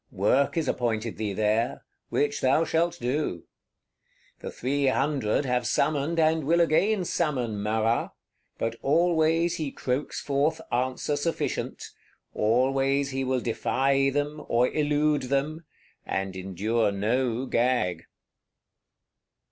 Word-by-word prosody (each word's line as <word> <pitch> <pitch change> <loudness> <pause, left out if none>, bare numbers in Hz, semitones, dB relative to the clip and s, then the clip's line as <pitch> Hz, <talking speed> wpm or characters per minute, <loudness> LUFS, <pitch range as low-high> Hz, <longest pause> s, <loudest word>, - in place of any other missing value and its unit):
Work 130 - +1
is 160 -4 0
appointed 115 -3 -1
thee 105 -2 -2
there; 110 +3 0 0.2
which 145 0 0
thou 135 +5 +3
shalt 170 +2 0
do. 125 - -2 1.0
The - - -6
Three 140 +2 -1
Hundred 135 -2 +1
have 125 -1 0
summoned 155 +2 +1
and 160 0 +3
will 165 +5 +2
again 185 +4 +2
summon 125 -12 -1
Marat: 110 +2 0 0.5
but 115 0 -2
always 165 +2 +2
he 150 -4 -3
croaks 130 +3 -3
forth 145 +3 0
answer 130 +4 -1
sufficient; 160 +3 -3 0.4
always 135 +5 +1
he 135 0 -2
will 130 -1 0
defy 135 +4 +1
them, 145 +2 -2
or 120 +2 +2
elude 150 -2 +1
them; 150 +4 -1 0.4
and 95 0 -3
endure 100 +4 0
no 120 +5 0
gag. 120 -10 0
135 Hz, 115 wpm, -26 LUFS, 115-150 Hz, 1.0 s, thou